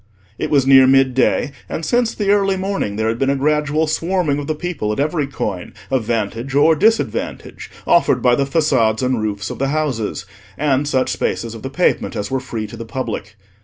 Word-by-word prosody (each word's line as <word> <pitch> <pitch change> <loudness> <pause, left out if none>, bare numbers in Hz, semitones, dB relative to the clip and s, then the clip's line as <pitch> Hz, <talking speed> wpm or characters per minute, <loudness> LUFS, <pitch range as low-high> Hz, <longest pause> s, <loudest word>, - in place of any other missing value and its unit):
It - - -2
was 140 -3 +3
near 135 -1 +7
mid 135 -1 +4
day, 130 +2 +1 0.2
and 160 - -4
since 240 +5 +1
the 200 -2 +1
early 195 -2 +2
morning 190 - -2
there 110 +1 -1
had 115 +1 -1
been 135 - +1
a 140 - +2
gradual 150 +2 +1
swarming 165 -2 0
of 145 - -6
the 155 - -1
people 155 -10 -3
at 105 - -3
every 150 0 0
coign 100 -9 -5 0.2
of 130 -4 0
vantage 115 +3 -2
or 160 +3 +5
disadvantage 225 +9 -1 0.2
offered 155 -7 +3
by 125 0 +3
the 140 +3 +2
façades 135 -7 +1
and 125 -3 0
roofs 105 -1 -3
of - - -7
the 135 - 0
houses, 135 -10 -2 0.3
and 145 -1 +1
such 130 -3 +1
spaces 115 -1 -2
of 115 - -9
the 130 - -5
pavement 180 +6 0
as 105 +3 -4
were 135 - 0
free 115 -4 -5
to 105 +2 -10
the 115 - -6
public. 110 -4 -5
135 Hz, 205 wpm, -19 LUFS, 115-155 Hz, 0.3 s, near